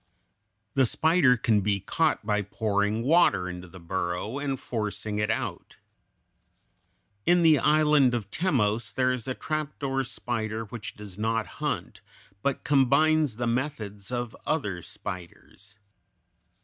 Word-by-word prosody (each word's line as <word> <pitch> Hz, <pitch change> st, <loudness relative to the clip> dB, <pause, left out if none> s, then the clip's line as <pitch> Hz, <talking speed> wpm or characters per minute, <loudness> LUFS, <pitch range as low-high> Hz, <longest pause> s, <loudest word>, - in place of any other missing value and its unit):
The 135 Hz, -2 st, +4 dB
spider 155 Hz, -3 st, +4 dB
can 110 Hz, -3 st, +2 dB
be 100 Hz, 0 st, +1 dB
caught 155 Hz, -, 0 dB
by 105 Hz, -1 st, +1 dB
pouring 105 Hz, +1 st, 0 dB
water 140 Hz, -, +4 dB
into 90 Hz, 0 st, -7 dB
the 95 Hz, +1 st, -12 dB
burrow 90 Hz, +7 st, -3 dB
and 135 Hz, -2 st, -2 dB
forcing 105 Hz, -2 st, -3 dB
it 105 Hz, +1 st, 0 dB
out. -, -, -3 dB, 1.5 s
In 175 Hz, 0 st, +5 dB
the 155 Hz, -3 st, +6 dB
island 150 Hz, -4 st, +4 dB
of 105 Hz, -4 st, -4 dB
Timos 115 Hz, -, 0 dB
there 130 Hz, 0 st, +1 dB
is 125 Hz, -2 st, -5 dB
a 130 Hz, -, -2 dB
trapdoor 145 Hz, -3 st, -2 dB
spider 115 Hz, -4 st, -3 dB
which 110 Hz, -1 st, -8 dB
does 105 Hz, -2 st, -10 dB
not 110 Hz, 0 st, 0 dB, 0.2 s
hunt, -, -, -3 dB, 0.4 s
but 140 Hz, +2 st, -1 dB
combines 145 Hz, 0 st, +3 dB
the 120 Hz, +2 st, -2 dB
methods 115 Hz, -5 st, -3 dB
of 120 Hz, -2 st, -3 dB
other 105 Hz, -, -1 dB
spiders. 95 Hz, +4 st, -9 dB
115 Hz, 130 wpm, -27 LUFS, 105-140 Hz, 1.5 s, the